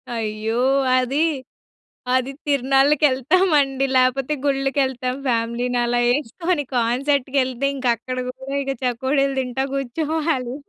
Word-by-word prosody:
అయ్యో! 220 0 -3 0.4
అది, 255 +4 0 0.9
అది 260 +1 0 0.2
తిర్నాళ్ళకెళ్తామండి. 275 +2 +3
లేపోతే 255 +3 +2
గుళ్ళకేళ్తాం 270 -2 0
ఫ్యామిలీని 240 +1 0
అలా 240 0 0
యేసుకొని 295 +5 -1
కాన్సర్ట్‌ 255 +4 +1
కేళ్తే 260 0 +1
ఇంకక్కడ 255 -1 -1
గూడా 265 +2 -6
ఇక 275 - -2
చకోడీలు 270 +3 0
తింటా 260 0 -2
గూర్చోవాలి. 275 -1 -2
265 Hz, 95 wpm, -21 LUFS, 245-275 Hz, 0.9 s, తిర్నాళ్ళకెళ్తామండి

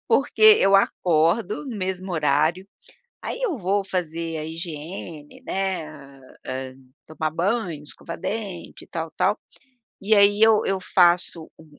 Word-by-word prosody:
porque 455 - +1 0.2
eu 195 0 +5
acordo 180 - +1
no 240 -5 -5
mesmo 185 -1 -4
horário, 155 +4 +1 0.6
aí - - -5
eu 410 - -1
vou 195 0 0
fazer 165 -3 -3
a 155 - -4
higiene, 160 - -8
né, 190 -4 -2 0.6
hā, 130 0 -5 0.3
tomar 155 0 -3
banho, 175 -3 -2
escovar 165 +3 -9
dente 195 -3 -6
e - - -29
tal, 165 -1 -5
tal, 205 - +1 0.6
e 210 +3 +2
aí 205 0 +5
eu 220 -1 +5
eu 195 -1 0
faço 175 -2 +3
o 160 - -16
180 Hz, 135 wpm, -23 LUFS, 160-200 Hz, 0.6 s, eu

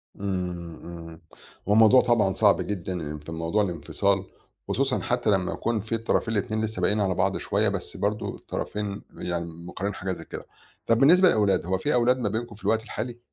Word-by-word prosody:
إمم، 90 -4 -4
إمم. 85 -1 -9 0.5
هو 105 - +4
موضوع 110 +3 +7
طبعًا 110 -5 +2
صعب 105 -1 +4
جدًا، 95 -2 -3
إن 75 -3 -5
في 75 +3 -10
موضوع 85 +6 0
الانفصال، 95 +3 0 0.4
خصوصًا 135 -1 0
حتّى 120 -3 0
لمّا 95 -3 +1
يكون 115 -2 -1
فيه 110 +3 -3
الطرفين 115 0 0
الاتنين 110 +1 -1
لسّه 110 0 -3
باقيين 105 +2 +2
على 95 -2 +1
بعض 95 +2 +1
شوية، 105 +1 +1
بس 100 -2 -5
برضه 105 +1 -1
الطرفين 105 -1 -4 0.2
يعني 85 -1 -3
مقرَّرين 85 +4 -5
حاجة 95 0 -4
زي 90 - -6
كده. - - -8 0.4
طَب 115 - +4
بالنسبة 180 +7 +7
للأولاد، 105 - +3
هو 95 +1 0
فيه 145 +10 0
أولاد 125 +1 +3
ما 125 - -1
بينكم 115 0 -4
في 105 - -19
الوقت 110 0 +2
الحالي؟ 120 +1 -5
100 Hz, 190 wpm, -26 LUFS, 90-110 Hz, 0.5 s, موضوع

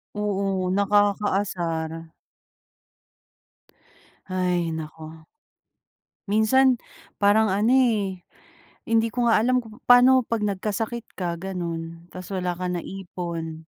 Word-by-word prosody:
Oo, 195 -2 -1
nakakaasar. 200 -5 +1 2.3
Hay 180 -3 -1
naku! 160 0 -8 1.0
Minsan 245 +6 +4 0.5
parang 215 +2 +5
ano, 210 +5 +2
eh, 215 -8 +2 0.7
hindi 230 0 +3
ko 240 -1 +1
nga 225 - +5
alam 250 +3 +2
kung 220 -2 -14
pa'no 250 +1 +6
'pag 230 -1 -2
nagkasakit 210 +3 -2
ka 170 -2 -3
gano'n, 170 -2 -6
ta's 185 +1 -8
wala 180 -2 -2
ka 180 - -4
naipon? 170 -3 -6
195 Hz, 95 wpm, -24 LUFS, 175-220 Hz, 2.3 s, pa'no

